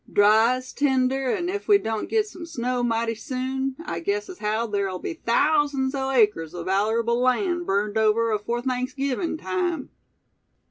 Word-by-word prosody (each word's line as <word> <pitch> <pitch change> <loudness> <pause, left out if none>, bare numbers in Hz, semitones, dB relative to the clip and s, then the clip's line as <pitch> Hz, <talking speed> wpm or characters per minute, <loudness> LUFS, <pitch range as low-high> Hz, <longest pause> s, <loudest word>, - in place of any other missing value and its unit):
"Dry 220 +4 +5
as 255 0 -8
tinder, 265 -1 +1
an' 345 +7 -1
ef 400 +3 -4
we 410 -2 +7
doan't 220 - -3
git 440 -1 +2
sum 365 -4 -10
snow 250 -4 -2
mighty 230 -1 0
soon, 260 +3 -3
I - - -3
guess 405 +3 -2
as 370 - -9
haow 215 +2 0
ther'll 200 -4 -2
be 255 - -5
thousands 290 -1 +1
o' 270 -1 -2
acres 210 -11 +2
o' - - -5
vallerable 225 +5 +1
land 345 +7 +1
burned 205 +2 0
over 220 +1 +2
afore 225 +3 -2
Thanksgivin' 265 +5 -2
time." 350 -4 -2
255 Hz, 165 wpm, -24 LUFS, 220-290 Hz, -, we